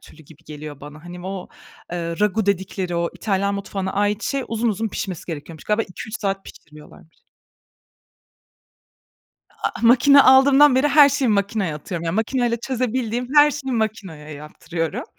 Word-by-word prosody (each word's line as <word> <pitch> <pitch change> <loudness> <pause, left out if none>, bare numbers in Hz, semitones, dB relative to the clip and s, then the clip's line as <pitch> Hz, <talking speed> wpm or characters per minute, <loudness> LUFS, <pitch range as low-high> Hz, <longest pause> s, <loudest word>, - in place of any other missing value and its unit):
türlü 160 - -17
gibi 160 +2 -19
geliyor 150 -2 -9
bana. 150 +2 -12
Hani, 175 +1 -9
o, 190 -1 -6 0.4
eee, - - -2
ragù 190 +5 -1
dedikleri 190 -2 -2
o 170 0 -1
İtalyan 200 -1 -1
mutfağına 195 -1 -4
ait 205 +2 0
şey 275 -1 -2
uzun 230 +1 -1
uzun 220 +1 -1
pişmesi 190 -4 -5
gerekiyormuş. 160 -1 -8
Galiba 210 +1 +1
2-3 215 +3 -8
saat 195 -1 -2
pişiriyorlarmış. 150 +1 -16 2.3
A - - -3
a - - -8
makina 265 +4 +6
aldığımdan 270 +1 +6
beri 265 +3 +3
her 290 -1 +7
şeyi 275 -3 0
makinaya 200 -4 0
atıyorum. 170 +3 -6
Yani, 165 +1 -2
makinayla 235 +2 0
çözebildiğim 245 -1 -2
her 295 0 +7
şeyi 275 -3 -5
makinaya 205 -9 -3
yaptırıyorum. 155 +2 -5
200 Hz, 150 wpm, -21 LUFS, 170-240 Hz, 2.3 s, her